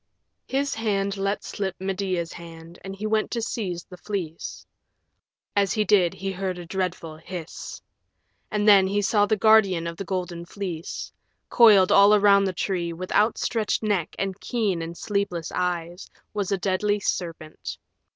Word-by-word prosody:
His 275 +1 0
hand 200 -3 -1
let 195 +1 -1
slip 190 -2 -3
Medea's 185 -3 -2
hand 165 0 -11
and 195 0 -6
he 205 +2 -6
went 215 0 +1
to 235 - -2
seize 185 -7 -3
the 180 - -13
Fleece. 180 -5 -5 0.9
As 200 -1 +2
he 215 -2 +1
did 185 -4 +3
he 195 +1 -3
heard 190 -1 -3
a 175 - -8
dreadful 170 -3 -3
hiss. 170 0 -8 0.7
And 210 0 0
then 195 -2 +7
he 205 +1 0
saw 205 +1 +3
the 215 - +2
guardian 195 -5 +4
of 170 0 -5
the - - -4
Golden 180 -3 -4
Fleece. 175 -2 -6 0.4
Coiled 210 -6 +7
all 200 +1 +7
around 200 -1 +5
the 190 - 0
tree, 175 -2 -2
with 180 +2 -7
outstretched 220 0 +1
neck 200 -6 -1
and 195 0 -3
keen 210 -8 -1
and 165 +1 -6
sleepless 200 -6 -2
eyes, 175 0 -3 0.2
was 205 -2 -2
a 195 - +2
deadly 205 +3 0
serpent. 165 -5 -4
195 Hz, 160 wpm, -25 LUFS, 175-205 Hz, 0.9 s, then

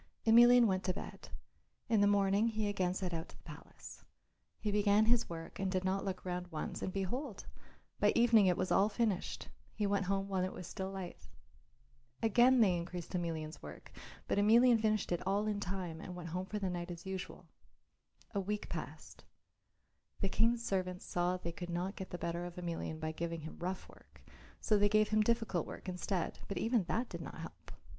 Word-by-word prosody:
Emelian 240 +2 +8
went 190 -3 +1
to 185 - 0
bed. - - -8 0.6
In 225 -3 +3
the 205 - +5
morning 200 +1 +3
he 215 -2 -1
again 185 -3 0
set 185 -3 -3
out 165 -1 -4
to - - -14
the - - -21
palace. - - -11 0.6
He 210 - -1
began 205 +1 +4
his 235 +1 +3
work 165 -1 -7
and 195 -1 0
did 185 -1 0
not 190 +1 0
look 185 -2 -4
round 180 0 -3
once, 160 -3 -5
and 185 - -2
behold! 210 +5 -3 0.5
by - - +4
evening 230 -4 +6
it 180 - +3
was 185 - -1
all 200 +2 +4
finished; 215 -5 -1 0.3
he 210 - 0
went 200 -1 +1
home 195 0 0
when 190 -2 0
it 185 - -2
was 180 - -7
still 190 +2 -5
light. 190 -2 -7 1.0
Again 240 +3 +5
they 190 -5 +5
increased 175 +1 -5
Emelian's 165 -3 -3
work, - - -10 0.4
but - - +1
Emelian 230 +3 +6
finished 215 -3 +1
it 175 - 0
all 200 +2 +1
in 210 -1 -1
time 180 -4 -4
and 180 - -7
went 170 -1 -6
home 180 +3 -3
for 210 - -3
the 200 -2 -1
night 175 0 -4
as 170 0 -7
usual. 190 -1 -6 0.9
A 200 - 0
week 205 +2 -3
passed. - - -7 1.0
The 195 - 0
King's 230 +3 +2
servants 185 -3 -2
saw 175 +1 0
that 185 - -5
they 170 - -2
could 175 +1 -7
not 180 +3 -2
get 190 - -7
the 175 - -5
better 170 0 -3
of 175 -1 -7
Emelian 170 -2 -4
by 155 0 -2
giving 165 0 -4
him 160 - -9
rough 180 +2 -4
work 70 -1 -19 0.4
so 210 -2 +2
they 205 0 +4
gave 215 0 +3
him 215 0 +3
difficult 220 -6 +1
work - - -9
instead, 180 0 -2
but 200 - -4
even 225 -4 +1
that 235 +7 -1
did - - -7
not - - -8
help. - - -10
190 Hz, 200 wpm, -34 LUFS, 180-215 Hz, 1.0 s, Emelian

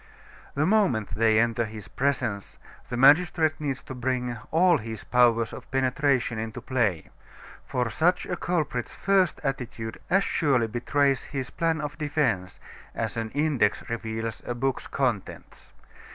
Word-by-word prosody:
The 145 +2 +2
moment 185 - +2
they 110 -1 +3
enter 115 0 +2
his 110 -4 -8
presence, 120 -7 -2 0.3
the 125 - -3
magistrate 155 +3 +4
needs 140 -2 -3
to - - -8
bring 125 -1 -2
all 170 -1 +4
his 110 -1 -7
powers 115 -2 +3
of 130 - -10
penetration 130 -2 +1
into 110 0 -5
play; 110 -11 -1 0.6
for 125 -1 0
such 175 - +2
a 180 - -2
culprit's 155 -9 -2
first 195 -3 +2
attitude 120 -5 -4
as 195 +2 +4
surely 135 -11 +2
betrays 135 +4 0
his 135 -3 -5
plan 165 -2 0
of 150 0 -5
defense 140 -12 -1 0.4
as - - -2
an 115 -1 -3
index 135 -9 +1
reveals 115 -1 -4
a 120 - -2
book's 135 +2 -2
contents. 125 -8 -3
130 Hz, 140 wpm, -26 LUFS, 115-150 Hz, 0.6 s, magistrate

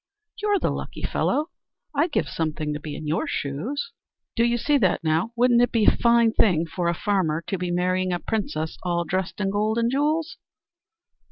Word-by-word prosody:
"You're 415 -1 +2
the - - 0
lucky - - -6
fellow. 305 +3 0 0.4
I'd 315 +4 +1
give - - 0
something 155 -2 -2
to 150 - -4
be 150 -1 -6
in 155 - -7
your 155 +3 -1
shoes." 195 - -3 0.4
"Do 230 - +3
you 240 0 +2
see 285 +4 +2
that 185 -6 +1
now! 160 +7 +1
Wouldn't 240 0 +4
it 245 - +2
be 225 -3 +2
a - - +6
fine 235 -1 +4
thing 170 -8 +3
for 170 +1 -3
a 170 - +1
farmer 170 -5 0
to 195 - -2
be 180 -1 -2
marrying 185 +1 0
a 175 - +1
princess, 175 -6 -3
all 175 -1 0
dressed 185 +3 -3
in 195 -1 0
gold 215 +2 0
and 235 0 +1
jewels?" 300 +4 0
195 Hz, 195 wpm, -24 LUFS, 170-235 Hz, 0.4 s, a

